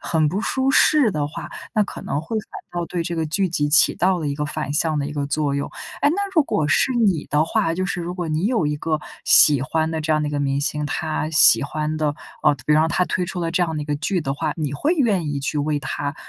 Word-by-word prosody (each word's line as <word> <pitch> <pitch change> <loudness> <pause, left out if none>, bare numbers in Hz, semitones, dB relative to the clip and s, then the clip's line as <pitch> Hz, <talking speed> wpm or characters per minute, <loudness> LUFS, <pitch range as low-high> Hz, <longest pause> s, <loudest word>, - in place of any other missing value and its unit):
很 160 -2 +1
不 180 +7 -1
舒 265 +3 0
适 275 -2 +4
的 150 -5 -1
话， 150 - -8 0.2
那 215 - +4
可 - - -8
能 140 - -3
会 220 +7 -3
反 215 - -9 0.3
倒 170 - -3
对 175 0 -3
这 170 +1 -4
个 160 -1 -1
剧 170 +6 0
集 150 -4 -1
起 145 0 +4
到 185 0 +1
了 160 - -3
一 140 - -1
个 150 +1 -3
反 155 -1 -4
向 155 +1 0
的 140 - -1
一 150 - -6
个 145 -1 -2
作 145 0 -1
用。 140 0 -3 0.3
哎， 285 - +4
那 315 - 0 0.2
如 320 - +5
果 155 - 0
是 155 - +2
你 200 -10 +1
的 150 +2 +2
话， 165 0 0
就 185 +2 -2
是 180 -1 -3
如 175 +1 -4
果 180 -2 -4
你 155 +4 0
有 225 -9 +1
一 150 - -1
个 155 +1 -1 0.3
喜 145 -3 +6
欢 160 +4 -1
的 160 -1 -2
这 155 +1 -3
样 155 0 +2
的 150 - -1
一 - - -8
个 145 - -1
明 140 -1 0
星， 150 +1 -2
他 155 +1 -2
喜 150 -7 +6
欢 155 +2 -3
的 155 - 0 0.4
呃， - - +4
他 130 -4 -16
比 150 - +3
方 155 +1 +3
他 180 +2 +1
推 180 - -2
出 190 - -7
了 165 -1 -1
这 175 +1 +1
样 160 -2 -4
的 150 - -2
一 - - -6
个 145 0 -2
剧 175 +5 -1
的 135 -3 -2
话， 155 +1 -2
你 150 -4 -3
会 295 - 0
愿 215 - +1
意 145 -1 -2
去 150 +2 -2
为 150 +1 0
他， 145 +1 -4
155 Hz, 300 characters per minute, -21 LUFS, 145-175 Hz, 0.4 s, 喜